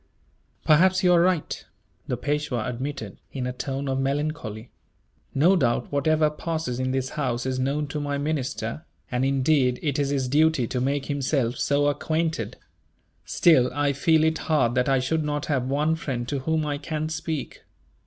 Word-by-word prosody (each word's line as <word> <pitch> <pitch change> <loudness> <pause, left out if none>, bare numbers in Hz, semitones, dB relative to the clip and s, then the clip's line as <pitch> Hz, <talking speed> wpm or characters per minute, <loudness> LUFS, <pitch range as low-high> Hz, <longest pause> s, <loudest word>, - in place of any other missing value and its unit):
"Perhaps 185 +5 +4
you 180 -1 +5
are 170 - +5
right," 180 -3 0 0.4
the - - -1
Peishwa 145 -5 -1
admitted, 125 -4 -5
in 130 -2 -3
a 125 - -2
tone 135 +2 -4
of 135 0 0
melancholy. 135 -5 -3 0.6
"No 170 +8 +5
doubt, 125 -9 0
whatever 155 +2 +2
passes 155 -5 -3
in 130 0 0
this 130 0 -1
house 125 -5 -2
is 130 -1 -1
known 140 +3 0
to 150 - -3
my 145 -1 -2
minister; 140 -3 -3 0.3
and 125 +1 0
indeed, 135 -1 +2
it 145 -2 0
is 140 -1 +1
his 135 -2 0
duty 150 -1 +3
to 125 +1 -2
make 140 +1 0
himself 135 -3 0
so 145 0 +2
acquainted. 160 +3 -1 0.7
Still, 145 -8 +4
I 145 -1 +1
feel 155 +3 +3
it 160 0 +1
hard 130 -7 +3
that 125 +1 +1
I 135 - +4
should 155 +5 0
not 150 0 -2
have 130 -4 0
one 150 +3 +1
friend 125 -7 -4
to 140 - -1
whom 155 +3 0
I 145 -1 -2
can 155 +1 -3
speak." 160 -2 -4
145 Hz, 175 wpm, -25 LUFS, 130-155 Hz, 0.7 s, you